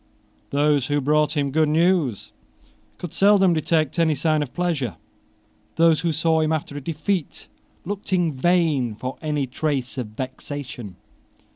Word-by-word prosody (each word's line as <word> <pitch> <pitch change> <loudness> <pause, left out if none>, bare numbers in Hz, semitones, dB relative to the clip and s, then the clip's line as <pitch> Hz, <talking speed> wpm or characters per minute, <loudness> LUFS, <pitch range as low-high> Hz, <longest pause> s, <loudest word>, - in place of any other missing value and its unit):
Those 145 -2 +2
who 145 0 +1
brought 150 +2 +1
him 140 -1 0
good 155 +1 +2
news 160 - +1 0.7
could 175 - -7
seldom 195 -2 +5
detect 155 -1 0
any 160 -2 +3
sign 155 +2 +1
of 140 -4 -4
pleasure. 145 - -2 0.8
Those 165 -1 +4
who 170 - 0
saw 160 +1 +2
him 155 0 +1
after 155 -2 -2
a 145 - -5
defeat 165 +3 -3 0.4
looked 200 +2 -5
in 175 -4 +2
vain 145 -6 +1
for 130 +4 -6
any 150 -3 -1
trace 135 -1 -2
of 120 - -3
vexation. 130 - -7
150 Hz, 145 wpm, -23 LUFS, 135-165 Hz, 0.8 s, seldom